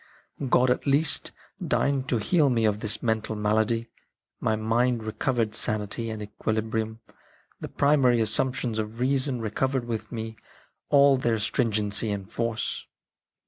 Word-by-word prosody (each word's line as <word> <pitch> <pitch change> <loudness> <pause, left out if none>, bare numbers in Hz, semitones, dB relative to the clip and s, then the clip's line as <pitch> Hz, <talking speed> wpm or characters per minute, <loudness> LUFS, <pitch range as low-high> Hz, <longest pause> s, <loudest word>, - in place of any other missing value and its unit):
God 125 +1 +4
at 125 - -1
last 140 +3 +2 0.3
deigned 140 -1 0
to 120 - +2
heal 145 - +2
me 115 -3 +1
of 105 -1 +1
this 110 -1 -1
mental 110 -1 -1
malady; 110 +2 0 0.5
my 110 - +1
mind 115 +2 +1
recovered 110 +1 -1
sanity 110 +2 0
and 110 -1 -5
equili 110 +1 -2
brium, 110 0 -3 0.6
the - - -6
primary 135 -4 +3
assumptions 125 +1 +1
of 110 +2 -5
reason 130 -1 0
re 110 -2 -3
covered 130 +2 -1
with 115 -2 -5
me 110 -1 -5 0.5
all 140 -1 +6
their 120 -3 0
stringency 105 -1 0
and 100 0 -4
force. 115 -1 -3
115 Hz, 145 wpm, -26 LUFS, 110-125 Hz, 0.6 s, all